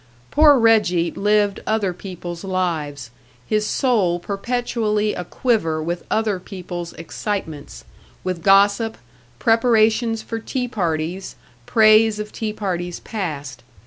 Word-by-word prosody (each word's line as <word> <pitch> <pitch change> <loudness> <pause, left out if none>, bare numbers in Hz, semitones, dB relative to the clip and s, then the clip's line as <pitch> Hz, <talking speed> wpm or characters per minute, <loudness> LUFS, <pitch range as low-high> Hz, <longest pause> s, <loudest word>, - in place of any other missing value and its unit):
Poor 295 -2 +6
Reggie 210 -8 +3
lived 205 -1 +1
other 215 -4 0
people's 175 -1 -8
lives, 160 -9 -2 0.3
his 215 +5 0
soul 210 -10 +1
perpetually 215 +2 -1
a 180 - -4
quiver 175 -6 0
with 170 +2 -3
other 215 -4 0
people's 180 -2 -7
excitements, 165 -2 -5 0.4
with 185 -2 -3
gossip, 200 +4 +4 0.4
preparations 225 - +2
for 225 - -4
tea 250 +2 -3
parties, 175 -3 -3 0.3
praise 215 -1 +5
of 210 0 -5
tea 220 -1 -3
parties 180 -4 -3
past. 145 - -5
200 Hz, 110 wpm, -21 LUFS, 175-220 Hz, 0.4 s, Poor